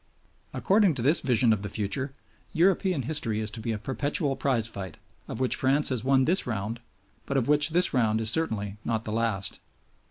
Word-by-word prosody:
According 195 -5 +2
to 120 - -2
this 150 +6 +4
vision 120 -3 +3
of 105 - -3
the 100 - -5
future, 115 +7 -2 0.4
European 180 -3 +2
history 115 -6 -1
is 110 -1 -3
to 115 - -6
be 115 +1 -3
a 110 - -2
perpetual 140 - -2
prize 130 -4 0
fight, 95 -7 -6 0.3
of - - -6
which 130 -1 +1
France 135 +3 +2
has 125 -4 -2
won 135 0 +3
this 175 +1 +1
round, 110 0 -3 0.5
but 140 - -1
of 125 - 0
which 150 +1 +4
this 175 +3 +2
round 110 -4 +1
is 110 -1 +3
certainly 105 -11 -2
not 110 -1 -2
the 110 - -6
last. 110 -4 -2
125 Hz, 195 wpm, -27 LUFS, 110-145 Hz, 0.5 s, this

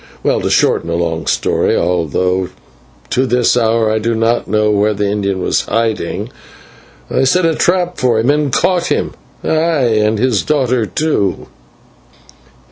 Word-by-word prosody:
Well, - - +1
to - - -1
shorten 85 - +1
a 85 - -1
long 80 -2 -2
story, - - +1
although 90 +2 0 0.6
to 130 +1 +1
this 125 -1 +2
hour 115 -2 +2
I 110 - 0
do 115 +1 -1
not 115 +1 0
know 105 +1 +1
where 105 +1 +1
the 105 +1 -1
Indian 100 -2 -2
was - - +1
hiding, 115 -1 -2 0.8
I 130 - +1
set 175 +7 +2
a 165 - +2
trap 180 +2 0
for 125 -3 +2
him 120 +5 +2
and 145 -2 0
caught 175 +5 +1
him - - -1 0.3
ay, - - -2 0.5
and 105 +1 +1
his 115 -3 +1
daughter 130 -6 0
too. 105 - -1
110 Hz, 155 wpm, -15 LUFS, 100-130 Hz, 0.8 s, this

